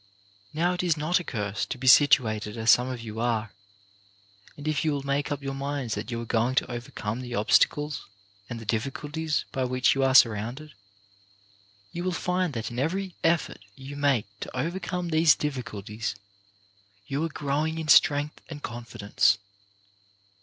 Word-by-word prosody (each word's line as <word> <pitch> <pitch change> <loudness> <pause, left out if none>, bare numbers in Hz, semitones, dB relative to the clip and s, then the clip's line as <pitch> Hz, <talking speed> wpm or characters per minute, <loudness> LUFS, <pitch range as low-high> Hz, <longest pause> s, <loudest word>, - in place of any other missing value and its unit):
Now 175 +3 +1
it 180 - -2
is 170 -3 +1
not 155 +5 +1
a - - -6
curse 105 - -3
to - - -4
be 130 - -7
situated 120 -5 +5
as 110 +1 +5
some 125 +1 +4
of 125 -2 -5
you 110 -1 -7
are, 115 -3 -1 1.1
and 145 +1 -7
if 155 -3 0
you 155 -2 +1
will 140 -1 -3
make 140 +1 -1
up 145 -1 -3
your 135 0 -3
minds 135 -4 -3
that 105 +4 -4
you 120 -1 -3
are 115 - -5
going 115 +3 +1
to 130 - +1
overcome 120 -1 -5
the 120 -1 -5
obstacles 145 +7 +2 0.4
and 120 - -5
the 115 - -10
difficulties 145 +7 -2
by 130 - -1
which 130 0 +2
you 135 - -1
are 130 0 +2
surrounded, 120 +6 +3 1.2
you 175 - -5
will 185 - 0
find 180 -1 -1
that 115 0 -4
in 120 - -4
every 185 +6 -1
effort 165 0 +1 0.2
you 135 +2 -9
make 140 -6 +2
to - - -7
overcome 175 +4 -2
these 160 -2 +5
difficulties 110 -7 -4 0.9
you 140 +7 -2
are 165 - -1
growing 150 +2 -1
in 160 -1 -4
strength 145 0 +4
and 145 -2 -8
confidence. 115 -4 0
135 Hz, 170 wpm, -27 LUFS, 115-155 Hz, 1.2 s, situated